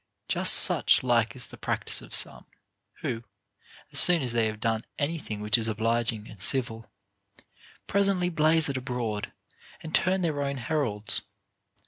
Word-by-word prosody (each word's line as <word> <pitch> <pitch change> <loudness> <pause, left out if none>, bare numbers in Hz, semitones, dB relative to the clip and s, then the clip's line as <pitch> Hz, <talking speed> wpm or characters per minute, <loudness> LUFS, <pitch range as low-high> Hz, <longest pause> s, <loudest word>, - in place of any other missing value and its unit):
Just - - +5
such - - +5
like 120 -2 +1
is 125 - -7
the - - -14
practice - - -1
of - - -14
some, - - 0 0.6
wrho, 115 0 -4 0.7
as - - +2
soon 175 -4 +5
as 125 -2 -2
they 115 -2 +1
have 110 -1 -6
done 110 0 -1
any 160 +3 -2
thing 105 -7 -7
which 105 +2 +3
is 110 - -1
obliging 115 0 -1
and 100 - -14
civil, 115 -1 0 0.9
presently 195 -3 +1
blaze 160 0 +3
it 140 -2 -3
abroad, 120 -5 -4 0.5
and 160 - -9
turn 190 +1 +1
their 155 -5 -2
own 140 -1 -3
heralds. 115 -7 -2
120 Hz, 155 wpm, -26 LUFS, 110-155 Hz, 0.9 s, Just